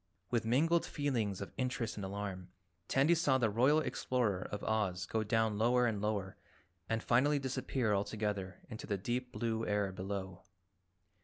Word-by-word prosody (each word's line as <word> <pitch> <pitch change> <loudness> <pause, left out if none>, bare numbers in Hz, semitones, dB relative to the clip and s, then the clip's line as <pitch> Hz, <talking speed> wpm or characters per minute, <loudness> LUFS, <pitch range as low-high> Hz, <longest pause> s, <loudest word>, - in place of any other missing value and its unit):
With 120 -2 +1
mingled 160 +9 +3
feelings 115 - -1
of 100 - -6
interest 125 -4 -1
and 105 - -5
alarm, 95 -2 -5 0.4
Tandy 140 +5 +4
saw 150 -6 +3
the 115 -4 +2
Royal 130 +8 +4
Explorer 115 -11 0
of 105 - -4
Oz 95 -5 0
go 110 +4 -1
down 110 -1 +1
lower 125 +2 +4
and 110 -4 0
lower 105 -3 -2 0.5
and 115 0 0
finally 140 +5 +3
disappear 130 -4 -1
altogether 100 -1 -2
into 110 -2 -8
the 100 - 0
deep 125 +5 -2
blue 115 -2 -1
air 105 -2 0
below. 95 -1 -5
110 Hz, 155 wpm, -34 LUFS, 100-125 Hz, 0.5 s, Tandy